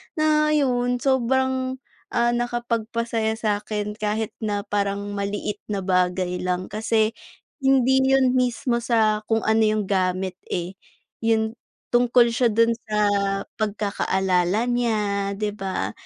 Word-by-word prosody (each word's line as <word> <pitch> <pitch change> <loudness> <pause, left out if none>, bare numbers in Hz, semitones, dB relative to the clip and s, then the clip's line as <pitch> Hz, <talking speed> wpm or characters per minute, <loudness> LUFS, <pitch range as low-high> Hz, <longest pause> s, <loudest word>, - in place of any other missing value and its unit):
Na 305 -1 +3
ayun, 245 -3 +1
sobrang, 260 0 +1 0.4
ah, 235 0 +3
nakapagpasaya 230 -2 -1
sakin 210 -1 -2
kahit 215 +1 -1
na 205 -2 -2
parang 200 -1 -2
maliit 205 +1 -3
na 200 -2 -3
bagay 180 -1 0
lang. 180 0 -2
Kasi 220 +1 +1 0.5
hindi 265 -1 +3
yun 265 -1 +4
mismo 250 -1 0
sa 220 -3 +2
kung 225 -1 +1
ano 220 0 +3
yung 215 0 +1
gamit, 185 -1 -1
eh. 180 +2 -4 0.4
Yun, 225 0 0 0.3
tungkol 240 0 +4
siya 240 +1 +2
dun 230 +1 +3 0.2
sa 215 - -2 0.6
pagkakaalala 200 -2 0
niya 210 -5 0
di 210 +1 -2
ba? 195 -2 -3
220 Hz, 120 wpm, -23 LUFS, 200-240 Hz, 0.6 s, yun